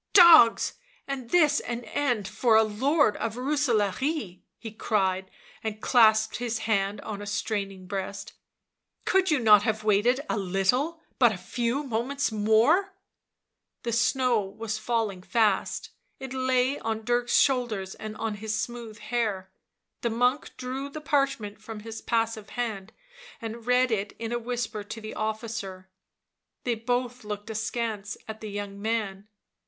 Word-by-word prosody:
" -, -, -52 dB
Dogs! 335 Hz, -, +7 dB, 0.3 s
was 270 Hz, -3 st, -4 dB
this 300 Hz, -1 st, +4 dB
an 240 Hz, 0 st, -5 dB
end 245 Hz, -7 st, -1 dB
for 230 Hz, +1 st, +2 dB
a 220 Hz, -, +7 dB
lord 255 Hz, +4 st, +2 dB
of 225 Hz, -1 st, -3 dB
Rooselaare!" 250 Hz, -, 0 dB, 0.2 s
he 225 Hz, -, -8 dB
cried, 190 Hz, -3 st, 0 dB, 0.3 s
and 215 Hz, -1 st, -3 dB
clasped 220 Hz, -2 st, +4 dB
his 235 Hz, -2 st, -2 dB
hand 200 Hz, -1 st, +1 dB
on 205 Hz, -2 st, -6 dB
a 205 Hz, -, -7 dB
straining 200 Hz, -2 st, -3 dB
breast. 195 Hz, +1 st, -5 dB, 0.4 s
" -, -, -47 dB
Could 380 Hz, 0 st, +3 dB
you 305 Hz, -, +4 dB
not 215 Hz, -5 st, +7 dB
have 220 Hz, 0 st, -1 dB
waited 215 Hz, +5 st, +3 dB
a 215 Hz, -, -1 dB
little— 245 Hz, -, 0 dB, 0.2 s
but 240 Hz, -3 st, +6 dB
a 205 Hz, -, -4 dB
few 235 Hz, +9 st, -2 dB
moments 260 Hz, +2 st, -1 dB
more 220 Hz, -, +4 dB
1" 395 Hz, -, -15 dB, 0.9 s
The 235 Hz, -, -2 dB
snow 235 Hz, +1 st, +2 dB
was 215 Hz, +2 st, -5 dB
falling 215 Hz, -5 st, -1 dB
fast; 215 Hz, 0 st, 0 dB, 0.3 s
it 265 Hz, -1 st, -6 dB
lay 260 Hz, +1 st, +1 dB
on 220 Hz, -1 st, -3 dB
Dirk's 240 Hz, 0 st, +2 dB
shoulders 235 Hz, -8 st, +1 dB
and 215 Hz, 0 st, -7 dB
on 225 Hz, -1 st, -2 dB
his 215 Hz, +1 st, -3 dB
smooth 230 Hz, -1 st, -5 dB
hair; 210 Hz, -6 st, -2 dB, 0.5 s
the 235 Hz, -, 0 dB
monk 245 Hz, +5 st, +1 dB
drew 265 Hz, +2 st, -4 dB
the 310 Hz, -, -7 dB
parchment 275 Hz, -8 st, -1 dB
from 215 Hz, 0 st, -8 dB
his 225 Hz, +1 st, -7 dB
passive 225 Hz, -3 st, -1 dB
hand 220 Hz, -5 st, -3 dB, 0.5 s
and 230 Hz, -1 st, -7 dB
read 250 Hz, 0 st, +3 dB
it 205 Hz, -2 st, -1 dB
in 225 Hz, 0 st, -4 dB
a 240 Hz, -, 0 dB
whisper 235 Hz, -3 st, -3 dB
to 220 Hz, +2 st, -7 dB
the 215 Hz, 0 st, -7 dB
officer; 215 Hz, -4 st, -4 dB, 0.7 s
they 245 Hz, -, +1 dB
both 245 Hz, +2 st, -2 dB
looked 210 Hz, +1 st, -5 dB
askance 220 Hz, -1 st, -3 dB
at 220 Hz, 0 st, -7 dB
the 215 Hz, -, -6 dB
young 200 Hz, -1 st, -6 dB
man. 210 Hz, -3 st, -2 dB
225 Hz, 155 wpm, -27 LUFS, 210-250 Hz, 0.9 s, Dogs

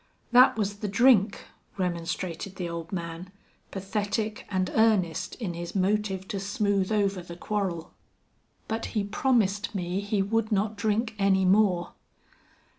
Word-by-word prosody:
"Thet 250 Hz, -1 st, +7 dB
was 205 Hz, -1 st, -1 dB
the 210 Hz, -, -4 dB
drink," 205 Hz, -1 st, +4 dB, 0.3 s
remonstrated 180 Hz, +1 st, -3 dB
the 180 Hz, -2 st, -4 dB
old 170 Hz, 0 st, -6 dB
man, 170 Hz, 0 st, -5 dB, 0.4 s
pathetic 210 Hz, +2 st, -3 dB
and 185 Hz, -2 st, -1 dB
earnest 205 Hz, -7 st, +2 dB
in 205 Hz, -8 st, -4 dB
his 170 Hz, +2 st, -6 dB
motive 195 Hz, 0 st, 0 dB
to 205 Hz, -4 st, -2 dB
smooth 200 Hz, 0 st, 0 dB
over 200 Hz, -3 st, +1 dB
the 170 Hz, 0 st, -9 dB
quarrel. 185 Hz, -4 st, -3 dB, 0.7 s
"But 225 Hz, 0 st, -2 dB
he 205 Hz, -, +2 dB
promised 210 Hz, -2 st, +1 dB
me 180 Hz, 0 st, -2 dB
he 205 Hz, 0 st, 0 dB
would 225 Hz, +2 st, 0 dB
not 210 Hz, +1 st, +1 dB
drink 220 Hz, +2 st, 0 dB
any 190 Hz, -1 st, +3 dB
more." 185 Hz, -3 st, +3 dB
200 Hz, 135 wpm, -27 LUFS, 185-215 Hz, 0.7 s, Thet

